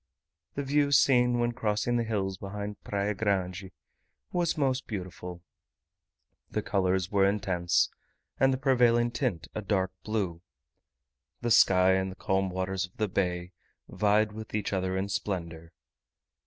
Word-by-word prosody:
The 140 - -2
view 140 +1 +2
seen 125 -3 +4
when 120 0 +1
crossing 115 +1 0
the 120 - +1
hills 100 -4 -2
behind 100 +1 -6
Praia 100 +1 -1
Grande 95 -3 -1 0.6
was 175 -2 0
most 135 -3 0
beautiful; 90 -3 -6 1.1
the - - -2
colours 95 -1 0
were 100 -1 +4
intense, 95 -4 +1 0.5
and 135 0 +5
the 130 - 0
prevailing 120 -3 +3
tint 85 -8 -2
a 110 - -3
dark 95 -2 0
blue; 95 -6 -2 1.0
the 120 -1 -1
sky 95 -3 +6
and 95 0 +1
the - - -10
calm 95 0 0
waters 95 +1 -2
of 90 - -31
the 110 - 0
bay 90 -2 -1 0.4
vied 105 +1 +2
with 110 0 -7
each 105 -1 -2
other 95 0 -1
in 95 +1 -1
splendour. 85 -5 -4
100 Hz, 140 wpm, -29 LUFS, 95-115 Hz, 1.1 s, sky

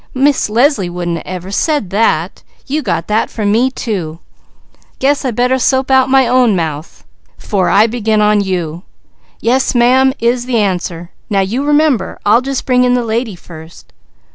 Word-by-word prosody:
Miss 275 -2 +1
Leslie 230 - +1
wouldn't 175 -1 -4
ever 185 +1 -6
said 290 - -1
that! 190 -5 0 0.2
You 300 +3 -2
got 185 - -2
that 215 +1 0
from 210 -2 -2
me, 240 +5 +2
too! 185 -11 -4 0.6
I - - -37 0.2
guess 285 +2 +1
I 265 - -1
better 250 +3 0
soap 260 +1 +1
out 265 0 +4
my 265 -1 +4 0.2
mouth 160 -7 -3 0.3
'fore 190 -5 -1
I 210 - +4
begin 220 -2 -1
on 210 0 +3
you. 175 -4 -3 0.6
'Yes 255 +2 +1
ma'am,' 260 +2 +4
is 240 +1 -1
the 245 -2 0
answer. 180 -4 -2 0.2
Now 195 -2 +1
you 225 +8 -2
remember! 295 -8 +1
I'll 220 +4 +4
just 270 0 -4
bring 250 -1 +2
in 250 0 +2
the 245 -1 -1
lady 225 -2 -2
first." 165 -1 -14
225 Hz, 165 wpm, -14 LUFS, 185-260 Hz, 0.6 s, out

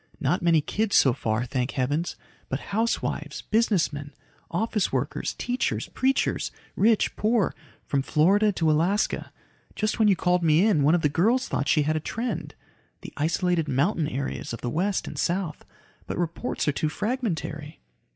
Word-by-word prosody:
"Not 155 +7 +1
many 165 -2 +4
kids 215 +7 -1
so 130 - +6
far, 115 -1 -1
thank 125 0 -2
heavens. 145 +6 -1 0.3
But 130 - -2
housewives, 225 +3 -1
businessmen, 170 -10 +1 0.3
office 210 +2 0
workers, - - -2
teachers, 245 0 -1
preachers 265 +1 0 0.3
rich, 220 +1 +3
poor 215 -3 +1 0.3
from 140 - 0
Florida 195 +10 +3
to 160 -3 +2
Alaska. 175 +7 +1 0.4
Just 215 +1 -1
when 220 - +5
you 200 - +5
called 180 0 +1
me 165 +3 +4
in, 200 -9 +3
one 150 +4 +4
of 175 - -1
the - - +5
girls 220 - +2
thought 140 - -1
she 150 - +3
had 155 +2 0
a - - +1
trend. 230 +10 -4 0.5
The - - -9
isolated 165 +1 0
mountain 150 +4 +1
areas 135 -4 -4
of 115 - -6
the 120 - -3
West 190 +6 0
and - - -6
South. 175 -3 -1 0.4
But - - -4
reports 175 +6 -2
are - - +4
too 150 +2 -1
fragmentary." 170 - -3
170 Hz, 160 wpm, -26 LUFS, 150-210 Hz, 0.5 s, so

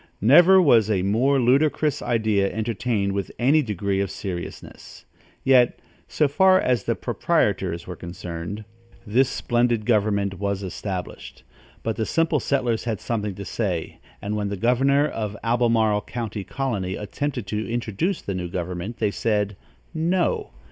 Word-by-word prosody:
Never 175 - +7
was 120 - +5
a 95 -4 +1
more 125 +8 +2
ludicrous 140 +4 +2
idea 110 -4 +1
entertained 110 -2 -1
with 100 -1 -3
any 140 +6 +4
degree 100 - -2
of 100 - -1
seriousness; 90 -3 -8 0.4
yet, 125 -2 +4 0.3
so 150 - +1
far 185 +6 +4
as 125 - 0
the - - 0
proprietors 85 -2 0
were 90 - -7
concerned, 85 +4 -7 0.4
this 125 +5 +2
splendid 120 -3 0
government 100 -4 +1
was 100 -1 -2
established; 95 0 -6 0.4
but 110 -1 -2
the 110 - -1
simple 165 -2 +1
settlers 125 -4 0
had 110 -5 -2
something 105 -4 -3
to 100 - -7
say; 95 -8 -3 0.2
and 105 +1 -2
when 105 -1 -2
the 100 - -4
governor 135 +7 +3
of 105 -6 -4
the 105 - -12
Albemarle 115 -3 +2
county 110 -3 -5
colony 100 -8 -3
attempted 125 +3 -4
to 105 +3 -3
introduce 120 - -2
the 100 - -3
new 90 -1 -3
government, 90 +5 -4
they 105 -2 0
said, 105 -2 -1 0.4
"No." 185 - 0
110 Hz, 150 wpm, -23 LUFS, 100-125 Hz, 0.4 s, Never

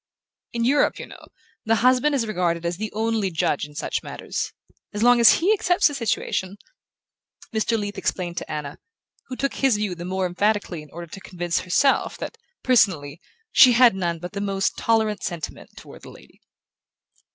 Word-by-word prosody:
"In 235 0 -1
Europe, 285 +4 +2
you - - -7
know, - - -14 0.4
the 225 +1 +2
husband 255 +5 +3
is 245 -4 0
regarded 175 -5 -1
as 170 0 -2
the 215 +1 -4
only 220 -2 -1
judge 160 -4 -1
in 150 0 -15
such - - -3
matters. - - -5 0.4
As 210 - -1
long 245 0 +5
as 235 - +8
he 375 +6 +2
accepts 355 -5 +2
the - - -7
situation 205 -6 -2 0.5
" - - -26
Mr. 225 +1 0
Leath 205 -1 -4
explained 175 -2 -3
to - - -5
Anna, 150 -2 -5 0.5
who 255 - -6
took 275 +2 -2
his 270 -4 +2
view 210 -3 -2
the 175 0 -8
more 185 +1 -2
emphatically 190 -1 -1
in 150 - -14
order 170 +3 -8
to 195 - -9
convince 175 -2 -2
herself 225 +10 +1
that, 460 - -7 0.2
personally, 170 - +2 0.3
she 255 -3 +7
had 240 -1 +6
none 175 -3 -2
but 180 +4 -8
the 200 - -4
most 195 -1 -1
tolerant 220 -2 0
sentiments 170 -6 -6
toward - - -13
the - - -12
lady. - - -17
205 Hz, 185 wpm, -23 LUFS, 175-235 Hz, 0.5 s, as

